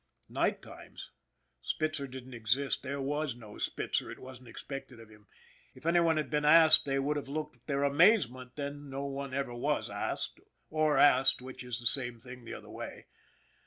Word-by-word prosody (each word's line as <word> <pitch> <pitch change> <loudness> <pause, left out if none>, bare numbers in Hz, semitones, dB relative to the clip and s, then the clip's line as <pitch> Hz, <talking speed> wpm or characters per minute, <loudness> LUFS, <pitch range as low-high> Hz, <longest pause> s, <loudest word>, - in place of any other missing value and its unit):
Night - - 0
times? - - -11 0.5
Spitzer 155 -3 -2
didn't 130 0 -9
exist, 120 +4 0
there 140 +1 -4
was 145 -1 -1
no 110 -3 -12
Spitzer - - -1
it - - -7
wasn't 130 -1 -11
expected 130 +1 -8
of 115 -1 -13
him! 105 -1 -18 0.5
If - - -15
any 170 +1 +4
one 165 -2 +3
had 155 - -2
been 150 -1 +1
asked 160 +1 +7
they 135 -1 0
would 145 +2 0
have 140 -2 -5
looked 150 -4 -5
their 140 -1 0
amazement, 140 - +4
but 145 - -4
then 145 0 -6
no 135 +1 -4
one 140 0 -4
ever 135 -2 -2
was 120 - -1
asked - - -3 0.3
or 155 -2 +2
asked, 135 -2 +5
which 130 0 -8
is 125 0 -4
the 120 - -10
same 120 0 +1
thing 125 0 -11
the - - -6
other - - -11
way. - - -8
135 Hz, 190 wpm, -31 LUFS, 125-150 Hz, 0.5 s, asked